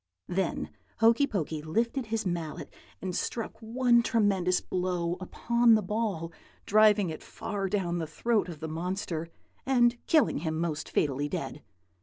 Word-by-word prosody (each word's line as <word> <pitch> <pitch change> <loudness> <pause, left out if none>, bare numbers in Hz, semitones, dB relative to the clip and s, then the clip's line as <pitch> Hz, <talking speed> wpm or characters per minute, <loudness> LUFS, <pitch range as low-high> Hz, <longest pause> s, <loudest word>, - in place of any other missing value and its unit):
"Then 185 -1 -2 0.3
Hokey 230 +5 +4
Pokey 160 - -2
lifted 230 - -1
his 220 -1 -2
mallet 170 -4 -4 0.3
and 185 -2 -3
struck 230 -2 -2
one 235 +1 +3
tremendous 195 -6 +2
blow 180 -2 -1
upon 235 +4 +3
the 215 - +1
ball, 195 -5 -2 0.3
driving 210 -3 +5
it 155 - -7
far 200 -3 -4
down 175 -4 -1
the 160 - -3
throat 215 +5 0
of 160 -3 -8
the 160 - -3
monster, 170 0 -3 0.4
and 240 -2 +3
killing 310 - +3
him 160 0 -2
most 160 -3 -2
fatally 145 0 0
dead. 150 -4 -4
190 Hz, 145 wpm, -29 LUFS, 165-225 Hz, 0.4 s, driving